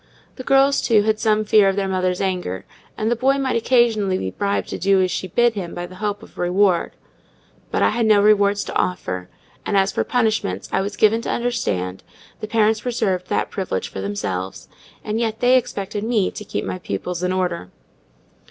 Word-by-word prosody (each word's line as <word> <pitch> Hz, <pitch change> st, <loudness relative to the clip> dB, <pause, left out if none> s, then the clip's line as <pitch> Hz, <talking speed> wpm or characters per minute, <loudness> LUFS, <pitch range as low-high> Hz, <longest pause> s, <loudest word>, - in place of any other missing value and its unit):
The 255 Hz, -, -6 dB
girls, 275 Hz, +1 st, +4 dB
too, 215 Hz, -4 st, +3 dB
had 215 Hz, 0 st, +1 dB
some 215 Hz, -1 st, +2 dB
fear 210 Hz, -2 st, +5 dB
of 195 Hz, -, -1 dB
their 200 Hz, -1 st, -1 dB
mother's 185 Hz, -1 st, 0 dB
anger; 180 Hz, -, -2 dB, 0.3 s
and 220 Hz, +2 st, 0 dB
the -, -, +3 dB
boy 265 Hz, +4 st, +2 dB
might 270 Hz, -1 st, -1 dB
occasionally 225 Hz, -5 st, +2 dB
be 95 Hz, -, -3 dB
bribed 200 Hz, -, -1 dB
to -, -, -5 dB
do 195 Hz, 0 st, +3 dB
as 185 Hz, -1 st, +1 dB
she 185 Hz, -, -3 dB
bid 240 Hz, +6 st, +2 dB
him 185 Hz, -5 st, -5 dB
by 175 Hz, -, -4 dB
the 185 Hz, +1 st, -12 dB
hope 205 Hz, -1 st, -2 dB
of -, -, -15 dB
reward; 180 Hz, 0 st, +2 dB, 0.8 s
but -, -, 0 dB
I -, -, +5 dB
had 235 Hz, -2 st, 0 dB
no 210 Hz, -1 st, +5 dB
rewards 205 Hz, -1 st, +3 dB
to -, -, -7 dB
offer; 90 Hz, -, -2 dB, 0.3 s
and 200 Hz, -, 0 dB
as 195 Hz, +1 st, +3 dB
for -, -, 0 dB
punishments, 220 Hz, -, 0 dB
I -, -, +1 dB
was 200 Hz, +1 st, -4 dB
given 220 Hz, +2 st, +3 dB
to -, -, -5 dB
understand, 95 Hz, -, -2 dB, 0.4 s
the 215 Hz, -, -5 dB
parents 220 Hz, 0 st, +2 dB
reserved 205 Hz, -7 st, -1 dB
that -, -, -1 dB
privilege 95 Hz, -, -3 dB
to 95 Hz, -, -4 dB
themselves; 95 Hz, -2 st, -4 dB, 0.4 s
and 215 Hz, +1 st, -2 dB
yet 225 Hz, -1 st, -1 dB
they 250 Hz, +1 st, +4 dB
expected 205 Hz, -4 st, -2 dB
me 220 Hz, -4 st, +1 dB
to 210 Hz, -, -8 dB
keep -, -, -4 dB
my 185 Hz, -, -4 dB
pupils 180 Hz, -1 st, -4 dB
in 180 Hz, 0 st, 0 dB
order. 180 Hz, -, -2 dB
200 Hz, 200 wpm, -21 LUFS, 180-225 Hz, 0.8 s, fear